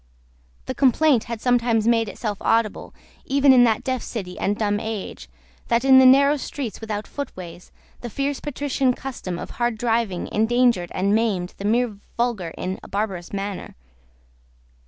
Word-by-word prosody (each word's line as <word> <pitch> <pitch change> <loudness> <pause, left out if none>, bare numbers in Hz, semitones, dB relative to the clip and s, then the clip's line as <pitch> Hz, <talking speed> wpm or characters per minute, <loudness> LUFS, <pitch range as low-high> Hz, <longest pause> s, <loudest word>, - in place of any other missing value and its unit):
The - - -3
complaint 270 0 +3
had 230 -2 -6
sometimes 235 -3 +2
made 230 -2 +2
itself 210 -2 -4
audible, 225 -2 0 0.3
even 275 0 +4
in 245 -1 +7
that 220 -2 +1
deaf 255 -2 -2
city 185 -6 -6
and 205 +1 0
dumb 205 -1 0
age, 220 -2 -6 0.4
that, 235 +2 +1
in 265 -1 +8
the 260 - +7
narrow 280 +3 +6
streets 265 -5 -6
without 215 -1 -4
footways, 180 -11 -8 0.3
the 240 - -6
fierce 275 +5 -2
patrician 275 -3 -1
custom 215 -10 -6
of - - -7
hard 240 -1 -1
driving 225 -5 -1
endangered 230 -4 +2
and 195 +2 +1
maimed 205 -5 0
the 200 - -5
mere 225 -1 +1 0.2
vulgar 235 -8 -1
in 185 +1 -4
a - - -12
barbarous 195 -4 -3
manner. 200 -1 -5
230 Hz, 155 wpm, -23 LUFS, 205-255 Hz, 0.4 s, in